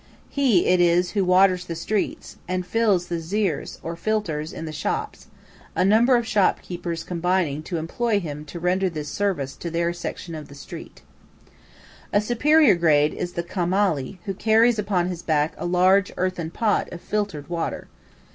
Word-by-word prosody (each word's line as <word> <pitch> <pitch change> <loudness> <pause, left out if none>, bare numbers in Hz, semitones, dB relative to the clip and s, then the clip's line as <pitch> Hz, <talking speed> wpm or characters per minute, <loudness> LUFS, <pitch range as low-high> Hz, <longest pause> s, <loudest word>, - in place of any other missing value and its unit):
He 255 -10 +3
it 180 - +3
is 175 +1 +3
who 200 -2 +1
waters 185 0 +4
the 165 - -5
streets 200 +5 -3
and 185 0 -2
fills 205 -4 +2
the 175 -1 -3
"zīrs," 180 0 -2
or 165 +1 -4
filters, 170 -5 -2
in 165 - -6
the 155 - -5
shops, 435 - -4 0.5
a - - +2
number 230 +6 +5
of 235 - -1
shop 205 -4 +2
keepers 170 -2 -5
combining 175 -4 0
to 170 +2 -4
employ 205 +7 0
him 150 -5 -6
to 170 +3 -8
render 185 +2 +1
this 150 -3 -5
service 175 -10 -2
to 170 - -5
their 170 +1 0
section 170 0 -6
of 155 -2 -8
a 140 - -12
street. 140 - -10 1.1
A 205 - +4
superior 245 +4 +4
grade 155 -4 +3
is 175 - -4
the 170 - -2
"khamali," 180 -3 0
who 195 - -2
carries 225 +3 +3
upon 195 -4 0
his 180 -2 -4
back 155 -2 +1
a - - -2
large 185 +2 +3
earthen 180 -3 -1
pot 210 +4 0
of 175 - -7
filtered 200 -8 -3
water. 170 -1 -3
180 Hz, 175 wpm, -23 LUFS, 165-205 Hz, 1.1 s, number